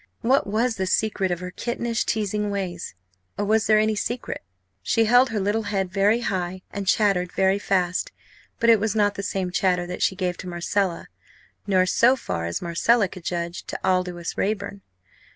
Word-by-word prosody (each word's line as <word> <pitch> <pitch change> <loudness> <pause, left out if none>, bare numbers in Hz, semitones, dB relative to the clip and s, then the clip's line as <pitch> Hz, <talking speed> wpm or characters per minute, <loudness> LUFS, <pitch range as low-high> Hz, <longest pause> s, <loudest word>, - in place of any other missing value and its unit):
what 260 0 +2
was 225 +3 0
the 190 -1 -1
secret 195 0 +1
of 175 0 -2
her 180 0 -5
kittenish, 235 +2 -2
teasing 210 -1 -1
ways 185 - -4 0.4
or 205 - -1
was 220 +1 +2
there 215 - +5
any 215 0 +3
secret? 240 +4 -3 0.4
She 225 - +2
held 245 +3 +5
her 220 -2 -2
little 205 +3 0
head 190 -3 -1
very 205 +4 +3
high 185 -4 -3
and 200 -1 -5
chattered 185 -3 +2
very 190 +1 +2
fast 185 -3 0 0.5
but 230 0 +5
it 225 - +5
was 220 +1 -1
not 205 -1 +3
the 200 - -5
same 185 -1 -2
chatter 180 -1 +1
that 180 0 -6
she 190 - +2
gave 180 -2 -2
to 185 - -7
Marcella, 175 +1 -1 0.6
nor, 185 -2 +3
so 240 +7 +4
far 85 - -4
as 85 - -3
Marcella 200 +6 +2
could 185 -1 -11
judge, 170 0 -3
to - - -5
Aldous 180 -2 -1
Raeburn. 200 -1 -2
195 Hz, 185 wpm, -24 LUFS, 180-215 Hz, 0.6 s, there